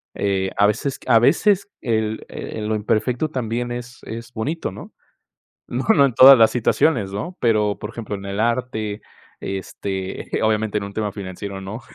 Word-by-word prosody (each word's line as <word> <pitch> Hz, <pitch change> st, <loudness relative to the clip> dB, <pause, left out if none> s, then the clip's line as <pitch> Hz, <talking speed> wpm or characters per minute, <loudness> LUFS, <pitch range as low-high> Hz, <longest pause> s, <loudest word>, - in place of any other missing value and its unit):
Eh 95 Hz, -1 st, 0 dB
a 100 Hz, -, +5 dB
veces 130 Hz, +6 st, -2 dB
a 115 Hz, -, +6 dB
veces 200 Hz, -, +3 dB
el 110 Hz, -2 st, -1 dB
el 105 Hz, -1 st, -6 dB
lo 110 Hz, -, 0 dB
imperfecto 115 Hz, +7 st, 0 dB
también 120 Hz, -3 st, -3 dB
es 120 Hz, 0 st, -7 dB
es 115 Hz, +2 st, -8 dB
bonito, 145 Hz, +9 st, -3 dB
¿no?, -, -, -11 dB, 0.8 s
no, 125 Hz, +2 st, -3 dB
no 140 Hz, -, +5 dB
en 135 Hz, -4 st, +1 dB
todas 135 Hz, +3 st, +10 dB
las 110 Hz, -1 st, +6 dB
situaciones, 120 Hz, -3 st, +1 dB
¿no?, 170 Hz, -, -5 dB
pero, 105 Hz, -3 st, +2 dB
por 105 Hz, -, -5 dB
ejemplo, 115 Hz, -3 st, -6 dB
en 100 Hz, -1 st, -7 dB
el 100 Hz, +1 st, -4 dB
arte, 115 Hz, -3 st, -1 dB, 0.4 s
este, 95 Hz, 0 st, -5 dB
obviamente 110 Hz, -1 st, +1 dB
en 100 Hz, -, -5 dB
un 100 Hz, -, -7 dB
tema 105 Hz, 0 st, -2 dB
financiero, 95 Hz, 0 st, -6 dB
no, 100 Hz, +5 st, -7 dB
110 Hz, 170 wpm, -21 LUFS, 100-125 Hz, 0.8 s, todas